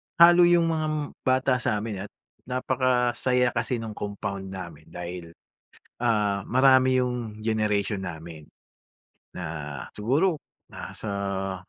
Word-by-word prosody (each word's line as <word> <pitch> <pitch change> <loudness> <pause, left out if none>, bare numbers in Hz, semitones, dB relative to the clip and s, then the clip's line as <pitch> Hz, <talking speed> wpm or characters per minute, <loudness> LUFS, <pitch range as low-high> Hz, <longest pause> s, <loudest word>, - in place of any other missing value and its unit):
halo 175 +1 +8
yung 170 -1 +4
mga 155 -1 -1 0.4
bata 130 0 +3
sa'min 105 -4 -2
at - - -38 0.4
napakasaya 125 -1 +1
kasi 120 0 -2
nung 110 - -5
compound 100 -2 -5
namin 85 -5 -8
dahil, 85 -1 -7 0.7
ah, 105 -4 +1
marami 130 0 +5
yung 125 -4 -2
generation 105 -2 0
namin 80 -3 -7 0.9
na 75 -4 -5
siguro 145 - +1 0.3
nasa 100 -2 -4
110 Hz, 105 wpm, -26 LUFS, 95-130 Hz, 0.9 s, halo